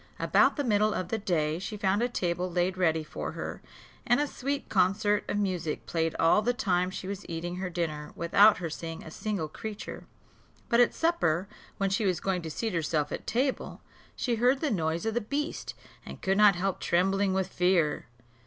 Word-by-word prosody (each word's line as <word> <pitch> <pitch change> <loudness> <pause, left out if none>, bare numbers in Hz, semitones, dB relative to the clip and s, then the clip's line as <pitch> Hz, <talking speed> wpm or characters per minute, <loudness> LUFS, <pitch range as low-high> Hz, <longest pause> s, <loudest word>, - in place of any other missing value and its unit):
About - - +3
the 290 - -1
middle 215 -3 +2
of 180 -1 -3
the 225 - -1
day, 160 -5 0
she 210 +3 -5
found 200 +1 +1
a 245 - +1
table 180 -4 -1
laid 180 +1 +1
ready 160 -4 +1
for 150 - -6
her; - - -6 0.4
and 245 +2 +3
a 295 - +2
sweet 280 0 -3
concert 205 +2 +2
of - - 0
music 180 -6 -2
played 165 -1 -1
all 165 +6 +4
the 245 +3 0
time 185 -7 +1
she 185 0 -6
was 200 0 -5
eating 170 +2 -4
her 185 0 -3
dinner 155 -4 -3
without 200 +5 +5
her 175 - -3
seeing 165 +1 -6
a 160 - -10
single 200 -3 -3
creature. 210 +7 -7 0.6
But 235 - +4
at 245 - +4
supper, 200 - +1 0.3
when 195 -1 0
she 195 +1 +1
was 180 -3 +1
going 190 -2 -1
to 165 - -6
seat 220 +6 -3
herself 155 -3 0
at - - -5
table, 260 +4 -1 0.3
she 240 -3 -1
heard 250 +4 +3
the 300 -2 -1
noise 165 -2 -1
of 225 - 0
the 240 - 0
beast, 290 +8 -3 0.3
and - - -9
could 195 0 +1
not 210 -3 +7
help 190 +1 -1
trembling 195 +3 +2
with 190 -1 0
fear. 180 -8 +1
190 Hz, 200 wpm, -29 LUFS, 170-215 Hz, 0.6 s, not